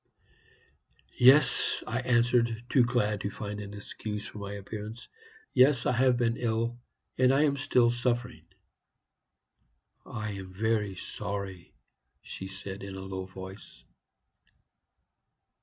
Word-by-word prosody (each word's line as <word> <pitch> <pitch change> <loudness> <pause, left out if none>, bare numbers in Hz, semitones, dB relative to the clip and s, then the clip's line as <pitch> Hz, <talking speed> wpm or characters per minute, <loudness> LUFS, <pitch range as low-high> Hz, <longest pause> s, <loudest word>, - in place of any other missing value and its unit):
"'Yes,' 130 +2 +5
I 120 +3 -2
answered, 120 -2 +2
too 130 - +5
glad 110 -4 +1
to 100 - -2
find 105 0 -6
an 100 0 -7
excuse 105 +1 -6
for 105 - -9
my 100 0 -5
appearance 105 +3 -7 0.5
'yes, 130 -1 +5
I - - +3
have 125 0 +3
been 115 -1 +1
ill, 115 0 -1 0.4
and 130 0 +6
I 140 +2 +4
am 145 -2 +3
still 130 -4 +3
suffering.' 120 0 -2 1.6
"'I 110 -3 -4
am 95 -2 -8
very 105 -2 0
sorry,' 100 -2 -6 0.5
she 95 - -7
said, 95 0 -7
in 100 -1 -7
a 95 - -6
low 95 -1 -5
voice. 95 +2 -11
110 Hz, 125 wpm, -29 LUFS, 100-125 Hz, 1.6 s, and